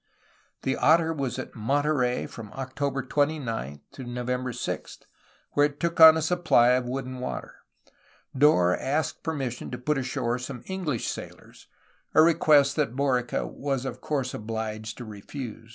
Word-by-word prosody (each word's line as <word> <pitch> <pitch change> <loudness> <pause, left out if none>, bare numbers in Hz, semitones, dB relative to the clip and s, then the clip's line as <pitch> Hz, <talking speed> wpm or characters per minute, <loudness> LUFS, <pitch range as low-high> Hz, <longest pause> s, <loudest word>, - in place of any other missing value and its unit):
The 135 - 0
Otter 165 0 +4
was 135 -5 -3
at - - -6
Monterey 135 +1 0
from 110 -3 -9
October 135 0 -3
29 130 - -1
to 135 - -9
November 125 +1 -3
6, 120 - -5 0.5
where 145 0 +4
it 145 -1 -14
took 170 -1 -1
on 160 0 +10
a 160 - -1
supply 160 -8 +4
of 125 0 +2
wood 135 +1 -3
and 130 0 -7
water. 125 - -5 0.8
Dorr 110 -11 +4
asked 150 +4 -2
permission 135 -7 -4
to 125 - -5
put 135 +4 0
ashore 130 -2 -2
some 125 0 -7
EngUsh 180 -10 -3
sailors, - - -8 0.5
a 155 - +8
request 150 -4 +4
that 140 -6 0
Borica 130 -3 0
was 135 -2 -3
of - - -5
course 135 -4 -2
obliged 110 0 -5
to 120 - -7
refuse. 110 +2 -8
130 Hz, 150 wpm, -26 LUFS, 120-150 Hz, 0.8 s, on